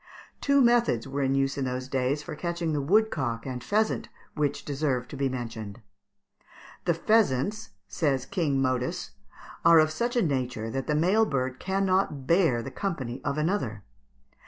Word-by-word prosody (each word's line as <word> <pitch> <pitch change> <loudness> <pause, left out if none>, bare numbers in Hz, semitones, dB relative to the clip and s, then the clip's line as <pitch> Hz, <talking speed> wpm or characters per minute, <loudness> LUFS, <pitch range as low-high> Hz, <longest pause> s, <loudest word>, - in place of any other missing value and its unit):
] - - -28
Two 280 0 +4
methods 235 - +3
were 140 +1 -3
in 135 0 +1
use 135 +1 0
in 135 - 0
those 130 0 -3
days 135 +2 0
for - - -6
catching 170 0 -2
the 145 - 0
woodcook 140 - +1
and 125 -2 -5
pheasant, 215 +1 0 0.2
which 145 -1 -1
deserve 135 -4 -1
to - - -7
be 135 0 0
mentioned. 115 -4 -6 1.1
"The 170 -2 +2
pheasants," 210 - +1 0.2
says 135 +6 0
"King 145 -7 0
Modus," 130 -1 -1 0.5
"are 165 - +7
of 155 0 +5
such 235 +10 -2
a 240 - +3
nature 125 -6 -2
that 135 +1 -3
the 150 - +1
male 195 +8 +3
bird 130 -2 -2
cannot 190 -7 0
bear 165 -8 +3
the 135 - -6
company 135 - -4
of 140 - -2
another." 150 - -1
140 Hz, 165 wpm, -27 LUFS, 130-175 Hz, 1.1 s, are